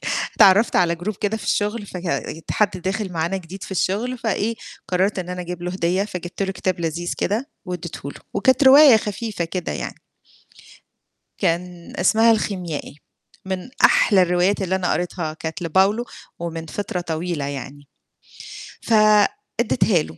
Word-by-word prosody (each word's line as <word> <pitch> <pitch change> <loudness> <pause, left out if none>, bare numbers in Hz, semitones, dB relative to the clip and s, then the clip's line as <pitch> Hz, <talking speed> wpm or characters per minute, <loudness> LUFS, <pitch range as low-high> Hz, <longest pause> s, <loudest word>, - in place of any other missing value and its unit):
ك - - 0 0.2
اتعرّفت 200 +4 +6
على 170 -1 +3
group 190 +4 -4
كده 210 +1 0
في - - -9
الشُغل 210 +1 -1
فك 180 -2 -7 0.3
يت 160 - -8
حد 210 -2 +2
داخِل 190 +1 -3
معانا 170 +3 -1
جديد 185 +1 -9
في - - -8
الشُغل 215 +7 -1
فإيه، 225 0 -1 0.3
قررت 190 +2 +1
إن 180 -1 -4
أنا 180 0 -4
أجيب 175 0 -6
له 180 - -2
هدية 185 +2 0
فجِبت 180 -1 -5
له 195 0 -1
كتاب 185 -2 -2
لذيذ 170 +1 -2
كده 230 - -1
واديته 170 -5 -6
له، - - -14
وكانت 260 +6 +3
رواية 270 -2 +9
خفيفة 210 -3 -3
كده 175 +1 -4
يعني. - - -6 1.4
كان 175 -1 -2
اسمها 225 +5 +5
الخيميائي، 180 -10 -2 0.5
من 190 +4 -4 0.2
أحلى 195 -4 +5
الروايات 180 +3 +2
اللي 190 0 0
أنا 185 -2 0
قريتها 175 -3 -3
كانت 160 +2 -6
لPaulo 190 +7 +2 0.4
ومن 165 -1 -5
فِطرة 180 +1 -4
طويلة 165 -2 -3
يعني. 140 0 -7 0.9
ف 230 - -1 0.7
ادّيتها 215 -7 +2
له 80 - -11
185 Hz, 155 wpm, -22 LUFS, 170-205 Hz, 1.4 s, رواية